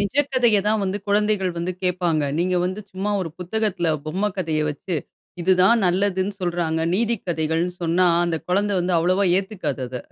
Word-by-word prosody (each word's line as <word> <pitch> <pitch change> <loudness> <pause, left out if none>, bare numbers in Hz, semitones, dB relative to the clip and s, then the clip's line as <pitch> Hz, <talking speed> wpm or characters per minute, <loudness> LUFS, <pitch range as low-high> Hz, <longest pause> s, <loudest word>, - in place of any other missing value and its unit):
நிஜ 200 +6 -2 0.2
கதைய 235 -5 +4
தான் 215 0 +2
வந்து 195 +2 -2
குழந்தைகள் 205 -2 +1
வந்து 180 +2 -2
கேட்பாங்க. 175 -4 +1 0.2
நீங்க 180 +2 +1
வந்து 185 +3 -3
சும்மா 195 +2 -2
ஒரு 165 - -5
புத்தகத்துல, 195 -2 -1 0.2
பொம்ம 190 +7 -1
கதைய 160 -4 0
வெச்சு. 160 +4 -4 0.5
இது 190 +2 +4
தான் 230 +4 +5
நல்லதுன்னு 190 +1 +1
சொல்றாங்க. 170 -2 -1
நீதிக்கதைகள்னு 175 -6 0
சொன்னா, 170 +2 +2 0.2
அந்த 170 -1 0
குழந்த 200 +3 +1
வந்து 180 +1 -1
அவ்வளவா 185 +4 +2
ஏத்துக்காது 190 -10 -4
அத! 125 - -6
185 Hz, 160 wpm, -22 LUFS, 170-205 Hz, 0.5 s, தான்